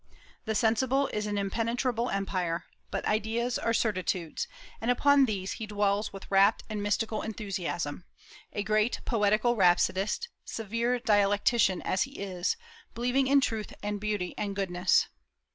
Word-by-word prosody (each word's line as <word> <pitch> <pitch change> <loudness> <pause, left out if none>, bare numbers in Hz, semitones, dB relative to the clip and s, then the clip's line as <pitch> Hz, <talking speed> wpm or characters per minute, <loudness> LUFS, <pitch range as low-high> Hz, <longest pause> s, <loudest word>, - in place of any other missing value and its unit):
The 220 -1 -1
sensible 255 +6 +2
is 210 0 -1
an 205 -1 -2
impenetrable 230 +4 -1
empire; 180 -4 -1 0.2
but - - -3
ideas 225 +3 0
are 230 - 0
certitudes, 185 -7 -1 0.3
and 230 - -1
upon 280 +2 +5
these 195 -5 -3
he 220 - -5
dwells 205 0 0
with 195 0 -10
rapt 195 +3 +4
and 210 -1 -2
mystical 215 +1 0
enthusiasm, 185 -7 -4 0.5
a 205 - -2
great 215 +3 +1
poetical 215 +1 +2
rhapsodist, 195 - +2
severe 230 +3 -1
dialectician 205 -3 +2
as 185 - 0
he 270 - -1
is, 185 - -2 0.4
believing 250 +3 +1
in 280 +1 +5
truth 220 -5 -2
and 205 0 -3
beauty 210 -4 -2
and 200 -1 -2
goodness. 185 -2 +2
210 Hz, 140 wpm, -29 LUFS, 195-235 Hz, 0.5 s, upon